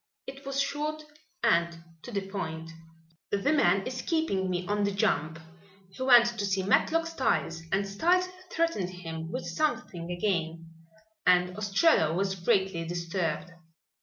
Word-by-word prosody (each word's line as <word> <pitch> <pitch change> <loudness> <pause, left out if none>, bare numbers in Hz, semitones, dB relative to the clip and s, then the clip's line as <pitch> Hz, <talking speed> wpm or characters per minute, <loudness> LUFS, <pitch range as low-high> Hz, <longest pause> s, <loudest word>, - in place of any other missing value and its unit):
It 275 +1 -10
was 275 0 -2
short 300 +2 -2 0.4
and 170 0 +2 0.2
to 245 - -9
the 200 -3 -3
point: 160 -4 -5 0.6
"The 205 +9 +1
man 195 - +3
is 255 0 -4
keeping 200 - 0
me 180 0 -2
on 205 +2 0
the 200 - +2
jump. 160 -5 0 0.5
He 195 - -11
went 245 -2 +7
to - - 0
see 195 -1 0
Matlock 315 - +2
Styles 260 - -1
and 195 +1 +1
Styles 350 - +2 0.2
threatened 330 - 0
him 165 -2 -7
with 170 - -4
something 190 - -2
again 165 -3 -2 0.6
and 180 0 +4
Ostrello 205 - +3
was 190 +1 0
greatly 190 -1 +1
disturbed. 170 -1 -3
195 Hz, 140 wpm, -29 LUFS, 170-250 Hz, 0.6 s, went